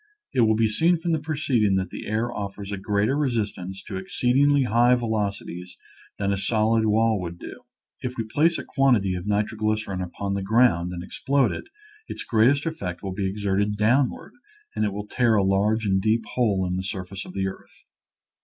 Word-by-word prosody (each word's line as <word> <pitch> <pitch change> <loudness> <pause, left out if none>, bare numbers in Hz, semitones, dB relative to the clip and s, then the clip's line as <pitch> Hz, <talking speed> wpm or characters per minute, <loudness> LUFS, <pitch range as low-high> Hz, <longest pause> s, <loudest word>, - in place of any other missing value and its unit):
It 125 - +3
will 110 -1 +4
be 110 0 +3
seen 165 +11 +3
from 170 +1 -2
the 160 - +1
preceding 140 -9 +1
that 95 -2 -1
the - - -7
air 115 +3 -1
offers 100 0 -6
a 100 - -3
greater 100 +5 0
resist 120 -8 0
ance 95 +2 -7
to 95 - -6
exceedingly 135 +8 +2
high 120 +1 +4
velocities 100 -6 -3 0.4
than 100 -1 0
a - - -1
solid 110 +1 +2
wall 110 -1 +2
would 85 -1 -6
do. - - -10 0.4
If 125 0 -5
we 115 - -1
place 155 +9 +2
a - - -6
quantity 120 - +2
of 90 +2 -5
nitroglycerin 105 -1 -1
upon 100 +2 -4
the 100 - -2
ground 95 -5 +3
and 90 -1 -6
explode 135 +7 +1
it, - - -7 0.4
its - - -5
greatest 125 +7 +3
effect 100 - -4
will 95 -1 -4
be 95 0 -1
exerted 100 +1 -1
downward, 120 +5 +1 0.4
and - - +1
it 105 - -1
will 105 +1 -5
tear 115 +1 +2
a 100 - +3
large 105 +3 +1
and 95 -1 +2
deep 110 +2 +1
hole 105 -7 +1
in 90 0 -2
the 95 - -3
surface 95 0 -5
of 90 - -11
the 95 -1 0
earth. 95 - -10
105 Hz, 195 wpm, -24 LUFS, 95-120 Hz, 0.4 s, will